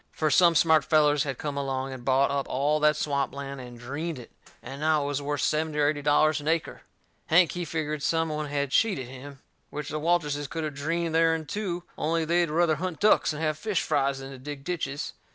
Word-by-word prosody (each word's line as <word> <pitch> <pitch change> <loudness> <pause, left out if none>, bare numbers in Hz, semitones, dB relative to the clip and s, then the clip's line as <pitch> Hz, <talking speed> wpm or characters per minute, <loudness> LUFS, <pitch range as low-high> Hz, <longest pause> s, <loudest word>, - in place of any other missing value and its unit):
Fur 155 -1 0
some 170 +3 +5
smart 160 -1 +5
fellers 150 -2 +3
had 135 -3 -3
come 145 -2 -4
along, 135 -1 -3
and 130 -2 -9
bought 135 +2 +2
up 140 -1 -1
all 145 +3 +1
that 150 0 +4
swamp 140 -2 -1
land 140 -1 -6
and 120 -1 -10
dreened 145 +6 -4
it, 120 - -11 0.3
and 140 +2 -8
now 155 -1 +2
it - - -3
was 145 0 -2
worth 145 0 -2
seventy 155 0 0
or 145 -1 +3
eighty 150 -1 -2
dollars 150 +1 +3
an 145 - -8
acre. 165 0 -1 0.5
Hank, 170 +1 +5
he 175 - -4
figgered 155 -1 -3
some 165 +2 +1
one 150 0 -3
had 140 -1 -2
cheated 170 - +1
him. 135 +1 -11 0.3
Which 150 -1 -6
the 155 - -3
Walterses 150 -3 0
could 165 -1 -4
of 155 -1 -3
dreened 165 +4 -2
theirn 165 -1 +2
too, 180 -1 -3 0.2
only 165 +1 0
they'd 170 +1 +2
ruther 160 0 +2
hunt 180 0 -4
ducks 210 -4 +4
and 155 +1 -5
have 155 -1 -1
fish 210 -2 -1
frys 140 -1 +1
than 135 0 -8
to 135 - -10
dig 145 +1 -7
ditches. 150 -4 -3
150 Hz, 225 wpm, -27 LUFS, 140-160 Hz, 0.5 s, some